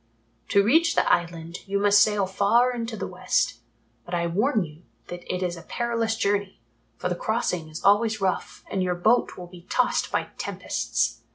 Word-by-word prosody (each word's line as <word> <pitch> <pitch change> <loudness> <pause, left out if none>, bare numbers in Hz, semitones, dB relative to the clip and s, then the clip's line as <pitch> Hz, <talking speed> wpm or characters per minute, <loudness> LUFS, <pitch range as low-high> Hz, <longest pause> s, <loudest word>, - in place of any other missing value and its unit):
To 200 - +4
reach 325 +10 +3
the - - +2
Island 170 0 -2
you 200 +1 0
must 205 0 +5
sail 205 -1 +3
far 230 +6 +2
into 230 -2 -4
the - - -3
West, - - -1 0.4
but 175 - -4
I 170 0 0
warn 210 +6 +1
you 155 +1 -14 0.3
that 175 0 -7
it 185 0 -2
is 175 -1 -2
a 170 - -10
perilous 230 +2 -1
journey, 200 -2 -1 0.4
for 180 - -2
the 180 - 0
crossing 180 -5 -2
is 155 +1 -8
always 215 +2 +3
rough 190 -2 -2
and 190 - 0
your 180 -1 0
boat 220 +8 +2
will 180 - -7
be 175 0 -15
tossed 250 - +1
by - - -1
tempests. - - -2
200 Hz, 185 wpm, -25 LUFS, 175-225 Hz, 0.4 s, must